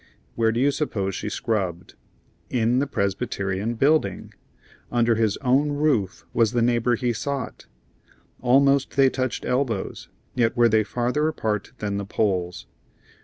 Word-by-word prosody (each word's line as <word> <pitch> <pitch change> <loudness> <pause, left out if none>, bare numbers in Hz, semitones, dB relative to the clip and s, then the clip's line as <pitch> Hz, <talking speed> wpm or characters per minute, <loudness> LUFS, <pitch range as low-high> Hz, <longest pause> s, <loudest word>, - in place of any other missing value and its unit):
Where 115 -1 +2
do 115 - -1
you 140 +3 +3
suppose 105 -10 -2
she 100 - -4
scrubbed? 95 -6 -2 0.6
In 120 +1 +2
the 140 - 0
Presbyterian 100 -1 -2
Building! 135 - +1 0.6
Under 120 -1 +3
his 110 -2 +1
own 140 +3 +2
roof 145 -11 0
was 115 -1 +2
the 120 - +2
neighbor 120 0 +2
he 120 +1 -1
sought. 135 +5 -4 0.7
Almost 140 +2 +3
they 135 -1 +5
touched 130 -2 -2
elbows, 125 -6 -2 0.2
yet 115 -2 +1
were 120 -1 +5
they 110 0 +3
farther 125 +7 0
apart 110 -9 -2
than 100 -1 -3
the 100 - -3
poles. 95 -4 -1
115 Hz, 140 wpm, -24 LUFS, 105-130 Hz, 0.7 s, they